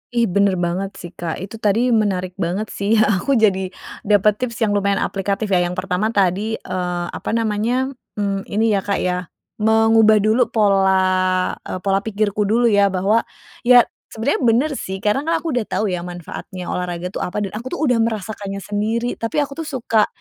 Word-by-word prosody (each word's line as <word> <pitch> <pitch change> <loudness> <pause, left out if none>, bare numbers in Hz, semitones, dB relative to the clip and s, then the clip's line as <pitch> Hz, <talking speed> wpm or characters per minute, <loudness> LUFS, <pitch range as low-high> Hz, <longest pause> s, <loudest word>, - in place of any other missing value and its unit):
Ih, 235 - +3
bener 200 -1 +2
banget 180 +2 -2
sih, 175 - -9
Kak. 170 -2 -4
Itu 195 +4 -8
tadi 225 +4 +2
menarik 195 -5 +1
banget 190 +5 -2
sih, 200 +3 0
aku 215 +4 +2
jadi 195 -5 +2 0.4
dapet 210 0 +3
tips 250 -2 -3
yang 215 - +2
lumayan 200 -1 +1
aplikatif, 200 +2 -2
ya. 185 - +4
Yang 180 - -5
pertama 190 +2 0
tadi, 200 +3 +1
eee, 180 -2 -3
apa - - -6
namanya, 230 +4 0 0.2
mmm 200 -1 -2
ini 220 +2 +1
ya, 200 - +2
Kak, 200 +1 -2
ya, 180 -1 -1 0.3
mengubah 220 -1 +4
dulu 225 +3 +3
pola, 190 -3 +2
e - - -8
pola 195 0 +2
pikirku 210 0 -1
dulu, 235 +2 +3
ya. 200 -1 +4
Bahwa, 195 +4 +2 0.5
ya 245 -1 +8 0.2
sebenernya 225 +6 -1
bener 245 +7 +3
sih, 190 0 -6
karena 270 +9 0
kan 330 0 0
aku 330 - -2
udah 245 -5 -1
tahu 210 -2 -1
ya 180 - -1
manfaatnya 175 +1 -7
olahraga 180 0 -3
tuh - - -5
apa, 210 +3 -2
dan 195 - -4
aku 225 +4 -6
tuh - - -3
udah 250 -5 +2
merasakannya 210 -3 -3
sendiri. 220 +5 -2
Tapi 230 +6 0
aku 280 +1 -8
tuh 325 - -4
suka, 230 -6 +1
205 Hz, 185 wpm, -20 LUFS, 190-225 Hz, 0.5 s, ya